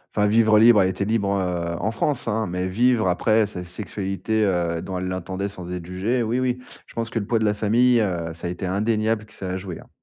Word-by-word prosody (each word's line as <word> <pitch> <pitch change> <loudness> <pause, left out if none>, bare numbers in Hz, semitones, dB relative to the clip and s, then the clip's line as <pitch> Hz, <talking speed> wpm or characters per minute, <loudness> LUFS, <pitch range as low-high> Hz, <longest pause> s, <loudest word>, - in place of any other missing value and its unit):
Enfin, 105 - +3
vivre 110 +1 +4
libre, 110 0 +7
elle 95 - +3
était 100 +1 -2
libre, 105 -2 0
heu, 85 -2 -2
en 110 +4 -1
France, 130 +3 -1
hein, 110 -1 0
mais 90 +1 -2
vivre 115 +2 +2
après 110 +5 +3
sa 95 -3 -6
sexualité, 100 +3 -2
heu, 85 -4 0
dont 95 - -5
elle 90 0 -3
l'entendait, 95 +2 -3
sans 90 -3 -8
être 90 -2 -5
jugée, 100 +8 -1
oui, 115 +3 0
oui. 125 -1 0 0.3
Je - - -17
pense 115 0 -3
que 115 - -1
le 100 - -5
poids 115 - +2
de 110 - +1
la 105 - +3
famille, 120 +4 +3
heu, 85 -5 -2
ça 85 - -6
a - - -2
été 90 +2 -4
indéniable 110 +3 0
que - - -19
ça 95 - -6
à 95 - -2
jouer, 95 -3 -7
hein. - - -15
100 Hz, 250 wpm, -23 LUFS, 90-110 Hz, 0.3 s, libre